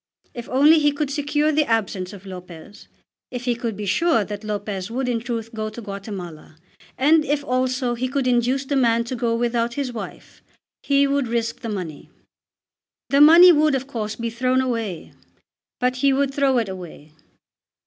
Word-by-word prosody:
If 240 -1 -8
only 295 +5 +5
he 295 -1 +3
could 285 -1 -3
secure 295 +1 0
the 300 -2 +1
absence 200 -4 -1
of 200 -2 -12
Lopez, 180 0 -11 0.4
if 250 -1 -6
he 245 - +2
could 230 -3 -4
be 210 - -5
sure 230 - +2
that 205 +1 -7
Lopez 205 -2 -4
would 255 +3 -2
in 240 -2 0
truth 230 -1 -5
go 215 -1 -3
to 215 - -10
Guatemala, 195 -7 -8 0.4
and 305 +4 +4
if 290 0 -1
also 255 -1 0
he 245 +2 -2
could 270 0 -2
induce 250 +2 +1
the 280 - -2
man 235 -3 +3
to 235 +2 -5
go 230 -1 0
without 235 0 -1
his 275 -3 -3
wife, 225 - -9 0.4
he 280 0 +3
would 280 -2 0
risk 230 0 -2
the 230 - -6
money. 180 -8 -6 1.0
The 280 +1 +4
money 335 +4 +9
would, 305 -2 +3
of 265 0 -3
course, 220 -6 -4
be 230 -1 -4
thrown 255 +2 +1
away, 230 -9 -3 0.7
but 250 0 0
he 275 +1 +3
would 275 0 0
throw 275 -2 +2
it 230 -3 0
away. 175 -5 -9
240 Hz, 180 wpm, -22 LUFS, 215-275 Hz, 1.0 s, money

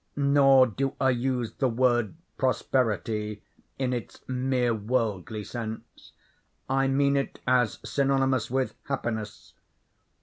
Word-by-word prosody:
Nor 140 -2 +5
do 135 +4 -2
I 130 -1 +3
use 125 -1 -1
the 130 - 0
word 120 0 +1 0.2
prosperity 110 -5 -1 0.3
in 130 -1 -1
its 120 -5 -7
mere 125 -2 0
worldly 110 -2 -2
sense. 110 0 -8 0.5
I 135 0 +2
mean 140 +1 +2
it 140 - -2
as 125 -3 +2
synonymous 135 -4 +1
with 130 +1 -1
happiness. 110 -6 -4
125 Hz, 110 wpm, -27 LUFS, 115-135 Hz, 0.5 s, Nor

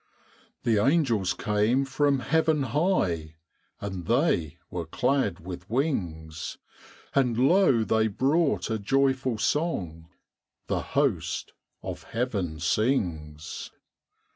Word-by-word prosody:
The 110 -3 +3
angels 130 - +2
came 105 +6 +1
from 140 0 +1
heaven 160 -1 +2
high, 115 - 0 0.4
And 95 -4 -5
they 115 - +1
were 85 -2 -4
clad 125 - 0
with 90 +1 -8
wings; 85 - -2 0.6
And 125 -4 +2
lo, 135 - +4
they 110 0 +2
brought 140 - +1
a 110 - 0
joyful 130 +2 +1
song 90 - -1 0.6
The - - -1
host - - -1 0.3
of - - -5
heaven 100 -10 -2
sings. 80 - -1
115 Hz, 100 wpm, -27 LUFS, 90-135 Hz, 0.6 s, lo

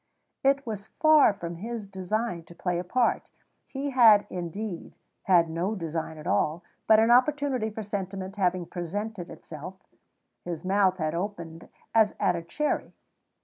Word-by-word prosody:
It 275 +1 +3
was 215 -3 -5
far 310 -6 +6
from 170 -4 -7
his 225 +3 -5
design 195 +1 -3
to 170 - -14
play 175 0 -1
a - - -3
part. 240 +7 0 0.4
He 280 +1 -4
had, 225 -5 +7
indeed, 180 +1 -5 0.3
had 175 -3 +5
no 170 +6 -2
design 160 -3 -4
at 150 - -10
all, 155 - 0 0.2
but 220 -1 +7
an 225 +1 +4
opportunity 260 -2 +3
for 220 +1 -6
sentiment 195 -1 -5
having 185 -3 0
presented 185 +3 -5
itself, 160 +4 -9 0.7
his 175 0 -5
mouth 190 -1 +3
had 155 -3 -1
opened 170 -3 -5 0.2
as 220 -2 +4
at 190 -3 +2
a 170 - -3
cherry. 295 - -2
195 Hz, 150 wpm, -27 LUFS, 170-220 Hz, 0.7 s, had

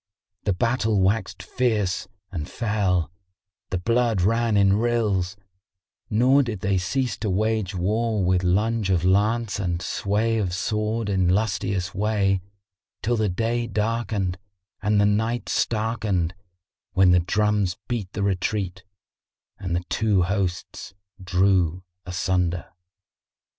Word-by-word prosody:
The 100 - +2
battle 110 +1 +1
waxed 100 +4 0
fierce 105 -8 0 0.2
and 80 -6 -5
fell, 100 -8 0 0.6
the 90 - -1
blood 115 +2 +1
ran 115 +1 +2
in 100 0 +4
rills, 105 -6 0 0.7
nor 130 +6 +4
did 115 -7 -3
they 95 0 +1
cease 125 +8 -1
to 105 - -2
wage 105 0 0
war 105 +3 0
with 90 0 +2
lunge 105 +3 +1
of 90 -2 +2
lance 105 +3 +2
and 85 -3 -1
sway 110 +5 0
of 90 -4 -1
sword 105 +4 -1
in 95 -3 +2
lustiest 95 -2 0
way, 100 -2 +1 0.6
till 120 +2 +1
the 110 -2 +1
day 115 +5 -1
darkened 105 -4 -1 0.4
and 105 -1 +2
the 100 - +4
night 110 +4 0
starkened, 105 -6 0 0.6
when 95 -1 +5
the 90 - +5
drums 105 0 +1
beat 115 -7 -3
the 100 - -2
retreat 95 -1 -1 0.8
and 90 -2 -2
the 90 - -1
two 100 -1 +1
hosts 95 0 -3 0.3
drew 90 -1 +2 0.2
asunder. 90 -1 -1
100 Hz, 125 wpm, -24 LUFS, 90-110 Hz, 0.8 s, when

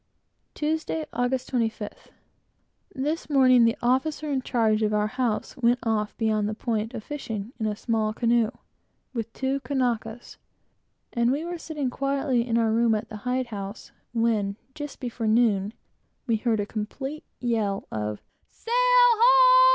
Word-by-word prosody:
Tuesday, 315 +1 -1
August 245 +1 -1
25th. 225 -4 -3 0.9
This 300 +5 -2
morning, 255 -4 +6
the 230 - +2
officer 290 +5 +1
in 270 -2 0
charge 225 -4 +1
of 210 -1 +1
our 210 0 +2
house 220 0 -2
went 240 -1 +3
off 215 -2 -1
beyond 215 -2 +1
the 215 - -3
point 225 +1 -2
a 225 - -4
fishing, 225 -4 -5
in 220 - 0
a 210 - -1
small 220 -1 0
canoe, 230 0 +2 0.6
with 230 -2 -4
two 265 +3 -1
Kanakas; 245 -4 -2 0.8
and 235 0 +2
we 295 +5 -1
were 345 0 -5
sitting 295 -6 -3
quietly 275 -3 0
in 230 -1 +1
our 225 -1 +2
room 230 0 +3
at 215 +1 -4
the 215 - -7
hide 255 0 0
house, 200 +1 -7 0.2
when, 225 -4 +1 0.2
just 295 -1 -7
before 235 -2 -3
noon, 215 -3 +3 0.5
we 230 -3 +1
heard 225 -1 0
a 205 - 0
complete 265 +8 -5 0.2
yell 220 -5 -1
of 105 -1 -4 0.3
"Sail 460 - -7
ho!" - - +6
235 Hz, 150 wpm, -26 LUFS, 220-275 Hz, 0.9 s, morning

